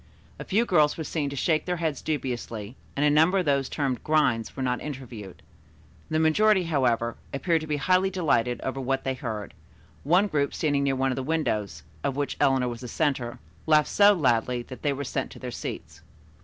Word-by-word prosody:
A -, -, -4 dB
few 220 Hz, +5 st, +1 dB
girls 155 Hz, -8 st, +3 dB
were 160 Hz, -, -3 dB
seen 150 Hz, -2 st, -2 dB
to 140 Hz, -, -6 dB
shake 155 Hz, +3 st, +1 dB
their 180 Hz, -, -1 dB
heads 160 Hz, -3 st, -2 dB
dubiously, 120 Hz, -6 st, -4 dB, 0.2 s
and 145 Hz, -, +1 dB
a -, -, +5 dB
number 160 Hz, +6 st, +4 dB
of 185 Hz, -, +1 dB
those 140 Hz, -2 st, +1 dB
termed 135 Hz, -5 st, -2 dB
"grinds" 135 Hz, -8 st, +1 dB
were 135 Hz, -, -3 dB
not 125 Hz, -1 st, -1 dB
interviewed. 125 Hz, -9 st, -8 dB, 0.7 s
The 155 Hz, -, 0 dB
majority, 185 Hz, +5 st, +4 dB
however, 125 Hz, -7 st, 0 dB
appeared 165 Hz, +3 st, +1 dB
to 155 Hz, -, -7 dB
be 150 Hz, -1 st, -1 dB
highly 185 Hz, +5 st, +2 dB
delighted 130 Hz, -10 st, 0 dB
over 135 Hz, 0 st, -3 dB
what 135 Hz, +1 st, -1 dB
they 135 Hz, -, -1 dB
heard, 110 Hz, -6 st, -5 dB, 0.5 s
one 180 Hz, +8 st, +4 dB
group 145 Hz, -7 st, -1 dB
standing 145 Hz, -3 st, +1 dB
near 135 Hz, -1 st, +1 dB
one 135 Hz, 0 st, +1 dB
of 130 Hz, -, -3 dB
the -, -, -1 dB
windows, 105 Hz, -, -2 dB, 0.2 s
of 135 Hz, -, -1 dB
which 145 Hz, 0 st, -2 dB
Eleanor 130 Hz, -2 st, +3 dB
was 120 Hz, 0 st, -5 dB
the 125 Hz, -, -6 dB
center, 130 Hz, -4 st, -1 dB, 0.3 s
laughed 155 Hz, -1 st, +4 dB
so 205 Hz, 0 st, +6 dB
loudly 125 Hz, -5 st, +1 dB
that 130 Hz, +1 st, -10 dB
they 145 Hz, -, +1 dB
were 140 Hz, +1 st, -3 dB
sent 130 Hz, -, -3 dB
to -, -, -12 dB
their 125 Hz, -1 st, -6 dB
seats. -, -, -7 dB
140 Hz, 205 wpm, -26 LUFS, 125-155 Hz, 0.7 s, so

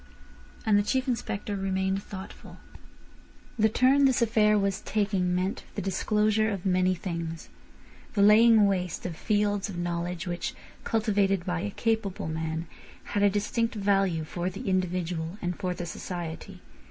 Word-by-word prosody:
And 210 Hz, -2 st, +4 dB
the -, -, +4 dB
Chief 260 Hz, +5 st, 0 dB
Inspector 210 Hz, -4 st, -2 dB
remained 190 Hz, 0 st, -1 dB
thoughtful. 190 Hz, -1 st, -10 dB, 1.0 s
The 220 Hz, +1 st, +5 dB
turn 265 Hz, +5 st, +4 dB
this 265 Hz, -2 st, +3 dB
affair 215 Hz, -2 st, +3 dB
was 195 Hz, 0 st, 0 dB
taking 195 Hz, -4 st, 0 dB
meant 185 Hz, +2 st, -1 dB
the 205 Hz, -, -2 dB
disclosure 215 Hz, +3 st, +1 dB
of 195 Hz, -3 st, -4 dB
many 185 Hz, 0 st, +2 dB
things—the 170 Hz, +4 st, -6 dB
laying 220 Hz, +1 st, +7 dB
waste 180 Hz, -4 st, -1 dB
of 175 Hz, -3 st, -3 dB
fields 205 Hz, +1 st, 0 dB
of 185 Hz, -, -6 dB
knowledge, 175 Hz, +1 st, -3 dB
which, 175 Hz, -1 st, -3 dB, 0.3 s
cultivated 200 Hz, -4 st, +1 dB
by 180 Hz, -2 st, -1 dB
a 205 Hz, +4 st, -2 dB
capable 220 Hz, -5 st, -1 dB
man, 160 Hz, +1 st, -3 dB, 0.5 s
had 205 Hz, -, +1 dB
a 205 Hz, -, +6 dB
distinct 225 Hz, +4 st, -1 dB
value 195 Hz, -5 st, +1 dB
for 175 Hz, +3 st, -3 dB
the 195 Hz, +3 st, -7 dB
individual 180 Hz, -2 st, -1 dB
and 175 Hz, 0 st, -2 dB
for 180 Hz, -1 st, -2 dB
the 175 Hz, -, -5 dB
society. 170 Hz, -1 st, -6 dB
195 Hz, 145 wpm, -28 LUFS, 180-210 Hz, 1.0 s, laying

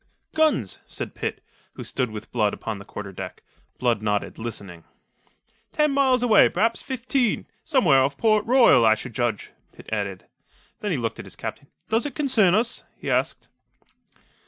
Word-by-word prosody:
"Guns!" 310 Hz, -, +1 dB
said -, -, -6 dB
Pitt, -, -, -4 dB, 0.3 s
who -, -, -8 dB
stood 125 Hz, -3 st, -2 dB
with 110 Hz, -1 st, -9 dB
Blood 105 Hz, -4 st, +1 dB
upon 110 Hz, -3 st, -5 dB
the 100 Hz, -, -11 dB
quarter 105 Hz, -2 st, -7 dB
deck. 95 Hz, -1 st, -8 dB, 0.3 s
Blood 120 Hz, -4 st, +1 dB
nodded, 105 Hz, 0 st, -2 dB
listening. 100 Hz, -7 st, -6 dB, 0.9 s
"Ten 300 Hz, -1 st, +2 dB
miles 265 Hz, -3 st, +3 dB
away, 225 Hz, -4 st, +6 dB
perhaps 225 Hz, +5 st, +1 dB
fifteen 255 Hz, -2 st, 0 dB, 0.2 s
somewhere 185 Hz, -, +4 dB
off 140 Hz, +1 st, 0 dB
Port 215 Hz, -2 st, +3 dB
Royal, 235 Hz, -, +6 dB
I 110 Hz, -1 st, +6 dB
should 115 Hz, +3 st, -8 dB
judge," 120 Hz, -2 st, -2 dB, 0.2 s
Pitt -, -, -15 dB
added. 100 Hz, -3 st, -3 dB, 0.5 s
Then 210 Hz, -, -3 dB
he 170 Hz, -, 0 dB
looked 115 Hz, -2 st, -3 dB
at -, -, -7 dB
his -, -, -9 dB
captain. 140 Hz, -, -7 dB, 0.2 s
"Does 225 Hz, +6 st, +1 dB
it 280 Hz, -, -9 dB
concern 230 Hz, -, +3 dB
us?" 230 Hz, +3 st, 0 dB
he -, -, -4 dB
asked. -, -, 0 dB
140 Hz, 165 wpm, -24 LUFS, -, 0.9 s, away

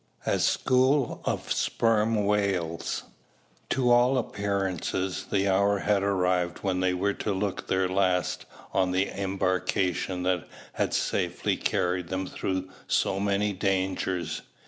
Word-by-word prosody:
A -, -, +1 dB
"SCHOOL" 130 Hz, +1 st, +2 dB
OF -, -, -2 dB
SPERM 110 Hz, -2 st, +1 dB
WHALES. 100 Hz, -5 st, 0 dB, 0.7 s
To 125 Hz, -2 st, +2 dB
all 125 Hz, +2 st, +5 dB
appearance 100 Hz, -6 st, -1 dB, 0.4 s
the 100 Hz, 0 st, +2 dB
hour 100 Hz, +1 st, +3 dB
had 100 Hz, 0 st, +1 dB
arrived 90 Hz, -3 st, 0 dB
when 95 Hz, -2 st, 0 dB
they 90 Hz, 0 st, +1 dB
were 100 Hz, +3 st, 0 dB
to 105 Hz, -, -3 dB
look 100 Hz, 0 st, -2 dB
their 95 Hz, 0 st, +2 dB
last 90 Hz, -1 st, 0 dB, 0.3 s
on 95 Hz, -1 st, +2 dB
the 95 Hz, +2 st, +1 dB
embarkation 95 Hz, -1 st, -1 dB
that 90 Hz, -2 st, 0 dB, 0.3 s
had -, -, 0 dB
safely -, -, 0 dB
carried 90 Hz, 0 st, 0 dB
them 95 Hz, +1 st, -2 dB
through 95 Hz, 0 st, -3 dB, 0.2 s
so 95 Hz, -, +1 dB
many 100 Hz, +1 st, +1 dB
dangers. 95 Hz, -2 st, -1 dB
95 Hz, 125 wpm, -27 LUFS, 90-100 Hz, 0.7 s, all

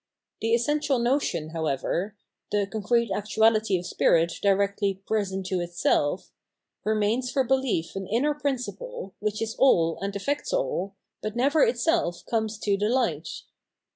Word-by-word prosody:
The 225 Hz, +1 st, +3 dB
essen 295 Hz, +6 st, +1 dB
tial 275 Hz, -4 st, +1 dB
notion, 240 Hz, -, 0 dB
however, 165 Hz, +5 st, -2 dB, 0.2 s
— -, -, -53 dB
the 205 Hz, -1 st, +2 dB
concrete 220 Hz, +2 st, 0 dB
actuality 215 Hz, 0 st, +2 dB
of 175 Hz, -, -6 dB
spirit 170 Hz, -1 st, +2 dB
directly 200 Hz, 0 st, +2 dB
present 195 Hz, -3 st, -1 dB
to 185 Hz, -1 st, -1 dB
itself 175 Hz, -1 st, 0 dB, 0.3 s
— -, -, -53 dB
^remains 220 Hz, +4 st, +1 dB
for 270 Hz, -, +2 dB
belief 255 Hz, -11 st, 0 dB
an 195 Hz, -1 st, -4 dB
inner 270 Hz, +8 st, +1 dB
principle, 285 Hz, -, -4 dB
which 210 Hz, +1 st, -1 dB
is 225 Hz, 0 st, -4 dB
all 165 Hz, -11 st, +4 dB
and 200 Hz, 0 st, -4 dB
effects 285 Hz, -, -2 dB
all, 200 Hz, -, -1 dB, 0.3 s
but 215 Hz, +1 st, -4 dB
never 280 Hz, +6 st, +3 dB
itself 330 Hz, -, +1 dB
comes 220 Hz, -1 st, -1 dB
to 200 Hz, -1 st, +1 dB
the 210 Hz, +2 st, 0 dB
light. 180 Hz, -, -1 dB
215 Hz, 150 wpm, -26 LUFS, 190-250 Hz, 0.3 s, all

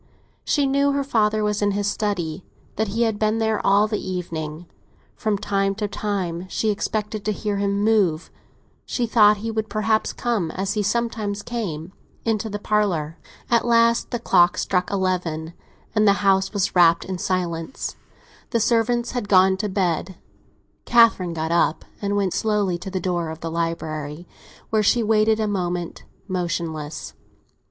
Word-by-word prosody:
She 290 Hz, -2 st, +1 dB
knew 280 Hz, +1 st, +2 dB
her 280 Hz, 0 st, 0 dB
father 215 Hz, -5 st, +1 dB
was 210 Hz, 0 st, 0 dB
in 205 Hz, -1 st, +2 dB
his 205 Hz, 0 st, -1 dB
study—that 200 Hz, +1 st, -3 dB
he 225 Hz, +4 st, 0 dB
had 220 Hz, -3 st, 0 dB
been 215 Hz, +1 st, +1 dB
there 220 Hz, -1 st, 0 dB
all 200 Hz, +1 st, +4 dB
the 210 Hz, -1 st, -2 dB
evening; 170 Hz, -3 st, -5 dB, 0.5 s
from 215 Hz, -2 st, -1 dB
time 195 Hz, 0 st, 0 dB
to 210 Hz, 0 st, -2 dB
time 190 Hz, -4 st, -3 dB
she 215 Hz, +2 st, 0 dB
expected 210 Hz, 0 st, -3 dB
to 215 Hz, -, 0 dB
hear 205 Hz, 0 st, -2 dB
him 200 Hz, 0 st, 0 dB
move. 200 Hz, -8 st, +2 dB, 0.5 s
She 245 Hz, -, -1 dB
thought 210 Hz, -2 st, +5 dB
he 225 Hz, -, -1 dB
would 220 Hz, -1 st, -2 dB
perhaps 215 Hz, +1 st, +1 dB
come, 225 Hz, -9 st, -1 dB
as 195 Hz, +1 st, -2 dB
he 210 Hz, -, 0 dB
sometimes 210 Hz, -1 st, -1 dB
came, 185 Hz, -8 st, -4 dB, 0.3 s
into 220 Hz, -1 st, 0 dB
the 205 Hz, -, -3 dB
parlour. 190 Hz, -7 st, 0 dB, 0.3 s
At 235 Hz, -, +4 dB
last 230 Hz, 0 st, +3 dB
the 240 Hz, -, -2 dB
clock 175 Hz, -6 st, +3 dB
struck 180 Hz, -1 st, 0 dB
eleven, 180 Hz, -4 st, -1 dB, 0.4 s
and 215 Hz, -1 st, +3 dB
the 200 Hz, -, +7 dB
house 190 Hz, 0 st, +3 dB
was 200 Hz, -3 st, -1 dB
wrapped 170 Hz, -1 st, +5 dB
in 185 Hz, -1 st, -4 dB
silence; 175 Hz, +1 st, -2 dB, 0.5 s
the 230 Hz, -, +1 dB
servants 235 Hz, +1 st, +1 dB
had 240 Hz, -5 st, -4 dB
gone 190 Hz, 0 st, +5 dB
to 210 Hz, +1 st, -2 dB
bed. 185 Hz, -1 st, -1 dB, 0.7 s
Catherine 225 Hz, -7 st, +4 dB
got 160 Hz, 0 st, -2 dB
up 170 Hz, -2 st, +1 dB, 0.2 s
and 200 Hz, 0 st, -1 dB
went 195 Hz, -3 st, 0 dB
slowly 205 Hz, -5 st, 0 dB
to 185 Hz, -, -6 dB
the 190 Hz, 0 st, -2 dB
door 175 Hz, -3 st, -1 dB
of 160 Hz, 0 st, -8 dB
the 165 Hz, -, -4 dB
library, 160 Hz, -1 st, -3 dB, 0.5 s
where 220 Hz, -1 st, +3 dB
she 230 Hz, +3 st, +3 dB
waited 220 Hz, 0 st, +3 dB
a 215 Hz, -, 0 dB
moment, 180 Hz, -4 st, -3 dB, 0.2 s
motionless. 170 Hz, -5 st, -3 dB
200 Hz, 160 wpm, -23 LUFS, 175-220 Hz, 0.7 s, the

